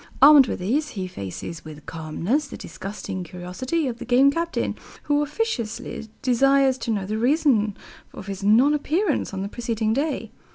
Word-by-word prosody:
Armed 285 -1 +9
with - - -2
these, 275 +12 0
he 190 - -2
faces 160 - -7
with 150 -2 -11
calmness 165 - -2
the - - -8
disgusting 195 -1 -6
curiosity 180 - -3
of 235 -2 -4
the - - -5
Game 260 +3 +5
Captain, 335 +3 -2 0.3
who 290 0 +2
officiously 250 - -3
desires 270 +1 +3
to - - -5
know 205 -4 0
the 215 +3 -2
reason 245 -6 +2 0.3
of - - -9
his 195 0 -6
non 235 +8 +5
appearance 310 +4 0
on 195 0 -4
the - - -3
preceding 225 -1 -1
day. 285 +5 -2
240 Hz, 165 wpm, -24 LUFS, 195-285 Hz, 0.3 s, Armed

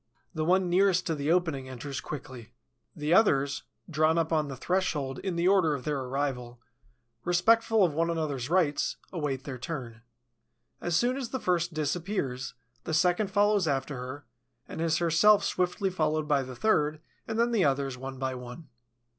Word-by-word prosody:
The 155 -2 -2
one 185 +3 +3
nearest 180 0 +3
to 165 - 0
the 145 +1 -1
opening 160 -7 0
enters 130 +2 -6
quickly. 125 -5 -8 0.4
The 150 +2 0
others, 140 -9 +3 0.3
drawn 155 0 +2
up 165 0 0
on 155 -2 +1
the 135 - -6
threshold 150 -4 -1
in 190 -3 -3
the 170 +1 +1
order 185 -6 +4
of 125 - -7
their 150 -2 -1
arrival, 130 -2 -3 0.6
respectful 220 +5 +3
of 165 - -1
one 165 +2 +1
another's 150 -6 -2
rights, 165 -5 +1 0.2
await 145 -6 -2
their 130 -3 -6
turn. 120 -6 -6 0.8
As 175 -1 -1
soon 245 +7 +2
as 255 -4 -4
the 260 - -3
first 175 -4 0
disappears, 150 -5 -2 0.3
the 160 - -2
second 180 +4 +2
follows 205 -2 +3
after 140 0 -1
her, 130 +3 -7 0.4
and - - -6
is 165 -1 +2
herself 175 +5 +4
swiftly 185 +2 0
followed 155 -3 0
by 145 -2 +3
the 130 -1 -7
third 155 - +1 0.3
and 225 - -3
then 235 +1 +2
the 220 -5 +3
others, 135 -1 0
one 135 +1 -7
by 130 0 -2
one. 125 +4 -9
155 Hz, 170 wpm, -28 LUFS, 135-180 Hz, 0.8 s, order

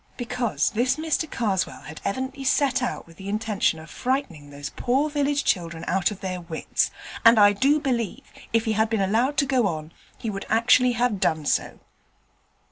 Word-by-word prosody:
Because 245 -2 -1
this 250 +3 +1
Mr 315 0 -1
Karswell 200 -8 -1
had 150 +3 -10
evidently 260 +6 -3
set 265 -1 +2
out 250 - -3
with 165 -1 -18
the 195 0 -7
intention 210 -5 0
of 160 0 -11
frightening 255 - -2
these 145 +1 -7
poor 275 +5 0
village 290 -1 0
children 170 -3 -1
out 185 0 +2
of 205 -3 -8
their 185 -2 -4
wits, 165 -2 -1 0.3
and 230 -1 +7
I 205 0 +7
do 275 +9 +3
believe, 240 -8 -2 0.3
if 230 0 +2
he 220 - +1
had 220 +1 +1
been 225 -2 0
allowed 230 +9 +1
to 280 - +3
go 260 -5 +2
on, 155 -2 -5 0.2
he 225 - -4
would 195 0 -6
actually 245 +2 +4
have 235 -4 0
done 160 -5 0
so. - - -1
225 Hz, 185 wpm, -24 LUFS, 190-260 Hz, 0.3 s, and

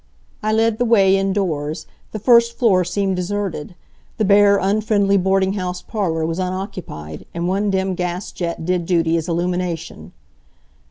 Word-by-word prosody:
I 215 0 0
led 225 0 +1
the - - +3
way 195 -5 +4
indoors. 175 -6 -1 0.3
The - - -4
first 235 +1 +4
floor 200 -7 +3
seemed 190 +2 -1
deserted. 180 -3 -3 0.4
The 215 - +1
bare, 200 0 +5
unfriendly 200 0 +1
boarding 190 +1 +1
house 180 -2 -4
parlor 165 -7 -2
was 165 +2 -3
unoccupied, 185 - -5
and 170 0 -2
one 200 +3 0
dim 190 -1 0
gas 180 +1 -3
jet 170 -2 -4
did 180 -1 -1
duty 165 -2 +2
as 165 +1 -2
illumination. 175 -1 -3
190 Hz, 150 wpm, -20 LUFS, 175-205 Hz, 0.4 s, bare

